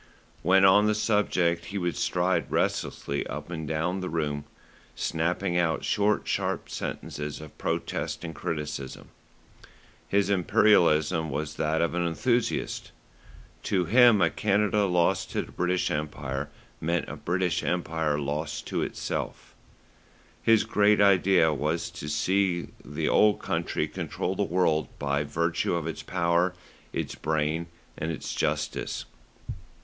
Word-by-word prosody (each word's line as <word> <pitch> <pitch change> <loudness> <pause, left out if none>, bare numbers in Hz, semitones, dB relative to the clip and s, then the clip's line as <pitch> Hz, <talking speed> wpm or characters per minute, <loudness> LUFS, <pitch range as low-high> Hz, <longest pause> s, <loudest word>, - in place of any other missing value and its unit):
When 95 +3 +5
on 105 +2 +6
the 105 - +2
subject 100 -6 +1
he 100 +4 -5
would 90 -3 -1
stride 90 +1 0
restlessly 70 - -1
up - - -6
and 80 -2 -4
down 80 +5 -1
the 90 -1 -4
room, 75 -3 -2 0.5
snapping 85 +2 0
out 80 -2 0
short, 105 0 +1
sharp - - -1
sentences 75 0 -5
of 75 -1 -11
protest - - -2
and 80 -1 -5
criticism. 75 -5 -5 1.0
His 100 0 +2
Imperialism 90 -5 +3
was 75 +1 -3
that 80 +1 +1
of 85 - +1
the 90 - -2
enthusiast. 115 +8 -1 0.7
To 90 -3 0
him 120 +1 +6
a 85 - +3
Canada 105 +3 +2
lost 90 -2 +1
to - - 0
the - - -13
British 90 0 0
Empire 70 -2 -3 0.3
meant 85 +2 -1
a - - -6
British 90 0 0
Empire 80 -4 -1
lost 75 +2 -3
to - - -1
itself. - - -4 0.9
His 115 -1 +4
great 105 0 +3
idea 95 -5 +5
was 75 +3 -1
to 75 - -7
see 90 +3 +1
the - - -3
Old 105 -1 +4
Country - - -1
control - - -3
the - - -1
world 80 -3 +1
by 70 0 0
virtue 85 +3 0
of 85 -2 -2
its 80 -2 -4
power, 85 0 +1 0.4
its - - -3
brain 80 +1 -1 0.3
and 80 +2 -3
its 80 - -5
justice. - - -2
85 Hz, 135 wpm, -27 LUFS, 75-95 Hz, 1.0 s, on